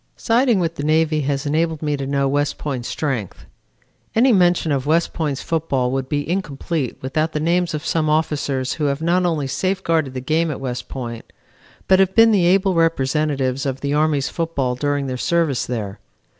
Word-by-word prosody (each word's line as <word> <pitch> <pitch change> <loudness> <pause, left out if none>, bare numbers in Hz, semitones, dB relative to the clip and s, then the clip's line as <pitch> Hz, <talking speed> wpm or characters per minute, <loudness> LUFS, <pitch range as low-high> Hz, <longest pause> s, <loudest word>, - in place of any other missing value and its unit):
Siding 240 -1 +2
with 165 -1 -2
the 145 - -3
Navy 155 0 +2
has 140 +1 -2
enabled 160 +1 0
me 150 -1 0
to 135 -1 -4
know 140 0 +1
West 145 +1 0
Point's 130 -5 -4
strength. 130 - -3 0.7
Any 250 +4 +5
mention 175 -4 +3
of 140 -1 -1
West 165 +2 +2
Point's 150 -5 -2
football 140 -6 -1
would 135 0 -2
be 145 -1 -1
incomplete 160 -5 -3
without 155 +4 -1
the 150 - -1
names 170 +1 +1
of 155 - -5
some 155 -2 0
officers 145 -4 0
who 150 - -2
have 140 +2 -1
not 180 +2 +2
only 155 -5 -1
safeguarded 165 -2 -1
the - - -2
game 160 +6 0
at 150 - -4
West 125 -2 -5
Point, 120 -3 -7 0.6
but 190 0 +5
have 190 -1 +2
been 225 0 +7
the 185 -5 +3
able 190 +1 +3
representatives 145 -4 0
of 135 -1 -3
the 140 0 -1
Army's 150 -2 +1
football 160 -7 -2
during 145 +2 -1
their 130 -1 -3
service 165 -2 0
there. 105 -5 -4
150 Hz, 185 wpm, -20 LUFS, 135-165 Hz, 0.7 s, been